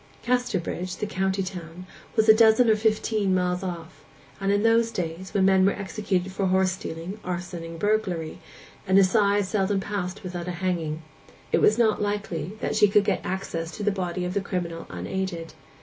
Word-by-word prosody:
Casterbridge, 190 -7 -1
the - - -2
county 190 -1 -1
town, 180 -1 -8 0.3
was 220 -1 +3
a 220 - +10
dozen 220 +1 +5
or - - +5
fifteen 215 -2 +1
miles 180 0 0
off; 170 -4 -7 0.4
and 195 - -1
though 200 - +4
in 205 - +1
those 230 0 +4
days, 180 -2 -4
when 195 -2 +2
men 190 -1 +5
were 195 - +4
executed 190 -2 -2
for 190 0 -1
horse 190 0 +3
stealing, 185 0 -6
arson, 175 -1 -4
and 165 0 -7
burglary, 185 -5 -1 0.5
an 190 +1 +4
assize 200 +1 +4
seldom 195 0 +1
passed 195 -1 -4
without 175 -1 -5
a - - -1
hanging, 160 -4 -1 0.5
it - - +3
was 215 - +5
not 220 -3 +2
likely 205 -5 -2
that - - -1
she 210 - +6
could 205 +1 +4
get 200 - 0
access 175 -3 -3
to 210 - -4
the 210 - +2
body 180 -2 -3
of 180 - -3
the 200 - 0
criminal 175 -4 -4
unaided. 165 - -4
190 Hz, 185 wpm, -25 LUFS, 180-205 Hz, 0.5 s, a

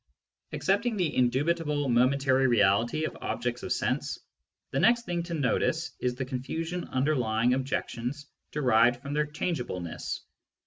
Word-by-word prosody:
Accepting 215 +4 0
the 175 -5 0
indubitable 145 +4 +1
momentary 130 +2 +3
reality 115 +5 +3
of - - -4
objects 120 0 -2
of - - -5
sense, - - -1 0.5
the 135 - 0
next 235 +5 +4
thing 175 -1 -1
to 170 0 -4
notice 155 +3 0
is 125 -1 -1
the 130 +1 -3
confusion 160 +7 -4
under 140 +4 +1
lying 115 -1 +2
objections 130 +1 -3 0.3
derived 120 -4 +3
from 140 0 -4
their 150 0 +1
changeableness. 125 - -3
135 Hz, 135 wpm, -28 LUFS, 120-155 Hz, 0.5 s, next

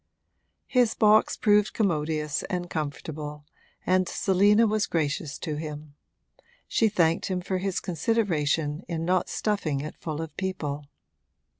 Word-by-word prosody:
His 245 -3 +2
box 215 0 +4
proved 210 -2 +3
commodious 155 -6 0
and 175 -1 -3
comfortable, 150 0 -5 0.4
and 185 -1 +2
Selina 205 +4 +4
was 215 -1 +1
gracious 150 -2 -1
to 155 -3 -4
him: 150 -1 -7 0.7
she 225 - +2
thanked 165 -3 +2
him 185 -1 -1
for 185 +1 -2
his 190 0 -1
consideration 165 -5 0
in 165 -1 -3
not 180 +1 +1
stuffing 185 -10 -1
it 150 - -6
full 155 -2 -5
of 160 -2 -6
people. 150 -7 -3
170 Hz, 130 wpm, -27 LUFS, 150-200 Hz, 0.7 s, box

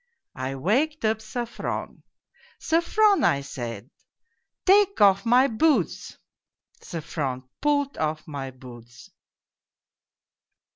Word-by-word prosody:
" - - -58
I 135 - -4
waked 250 - 0
up 220 0 +1
Sofron. 230 +2 -5 0.6
'Sofron,' 395 +5 +2
I 140 - +3
said, 120 -2 -7 0.4
' - - -52
take 400 +1 +4
off 200 +1 +4
my 250 +3 +5
boots.' 290 +6 0 0.3
" - - -39
Sofron 150 -6 -4 0.2
pulled 285 -1 0
off 155 0 -2
my 140 -3 -5
boots. 125 -2 -14
205 Hz, 105 wpm, -25 LUFS, -, 0.6 s, my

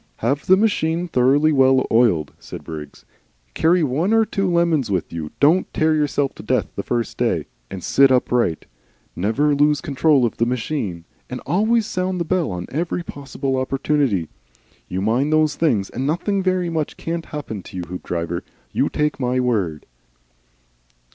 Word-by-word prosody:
"Have 140 +5 -1
the 190 - +6
machine 180 -5 +1
thoroughly 145 +2 +3
well 130 -2 +4
oiled," 105 -11 +3
said - - -9
Briggs, 75 -2 -9 0.5
"carry 170 - +3
one 155 - +1
or 225 0 +4
two 195 -3 -1
lemons 170 -7 +2
with 95 -5 -2
you, 80 -2 -4
don't 160 +6 +3
tear 155 0 +3
yourself 145 -2 0
to - - -11
death - - 0
the - - -2
first 120 -2 -3
day, - - 0 0.2
and 95 -3 -7
sit 135 0 +5
upright. 120 - +1 0.5
Never 120 +11 +1
lose 145 +1 +3
control 140 -2 +2
of 115 - -3
the 115 - +2
machine, 115 - -3 0.2
and 125 - -5
always 215 +8 +2
sound 185 -2 -2
the 170 - -1
bell 180 -1 0
on 90 -1 -4
every 170 +4 -2
possible 135 -3 -4
opportunity. 130 - 0 0.6
You 95 +1 -2
mind 125 +8 +1
those 155 -1 +3
things, 115 - +1
and 130 +3 -3
nothing 195 +6 0
very 185 -2 0
much 155 -2 -2
can't 165 0 -4
happen 140 -9 -6
to 95 +2 -10
you, 90 - -3
Hoopdriver 85 -1 -4 0.3
you - - +1
take 150 -1 -1
my 125 0 0
word." 100 -11 -1
140 Hz, 165 wpm, -21 LUFS, 115-165 Hz, 0.6 s, the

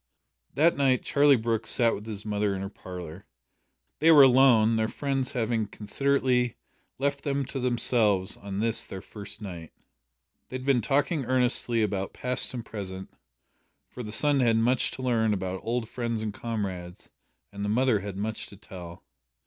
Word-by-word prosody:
That 160 +5 +4
night 135 -3 +2
Charlie 145 -1 +4
Brooke 115 -1 -1
sat 115 -2 +3
with 105 - -7
his 105 -2 -6
mother 105 -1 -1
in 95 - -4
her 100 - -6
parlour. 90 -2 -9 0.7
They 160 - +4
were 145 -3 +9
alone 125 -4 +5
their 110 0 +1
friends 135 +1 -2
having 115 -3 -1
considerately 125 +3 0 0.4
left 140 +1 -1
them 140 -2 -1
to 135 - -5
themselves 115 -6 +1
on 100 -1 -7
this 115 0 +2
their 95 0 -8
first 105 +1 -7
night. 85 -5 -8 0.8
They - - -7
had 130 0 -5
been 135 -3 +3
talking 140 - 0
earnestly 125 -2 +1
about 100 -2 -2
past 125 0 +1
and 120 - -6
present, 95 -3 -7 0.8
for 125 - -8
the 105 -3 -6
son 145 +4 +4
had 115 -3 +3
much 120 +2 +2
to 130 - -7
learn 110 -4 +1
about 95 0 -4
old 120 0 -2
friends 115 -2 -3
and 105 -2 -3
comrades, 95 -6 -5 0.4
and 100 0 -6
the 105 - -1
mother 120 0 +2
had 100 0 -7
much 110 +2 -4
to 100 - -13
tell. 90 -4 -11
115 Hz, 170 wpm, -27 LUFS, 100-130 Hz, 0.8 s, were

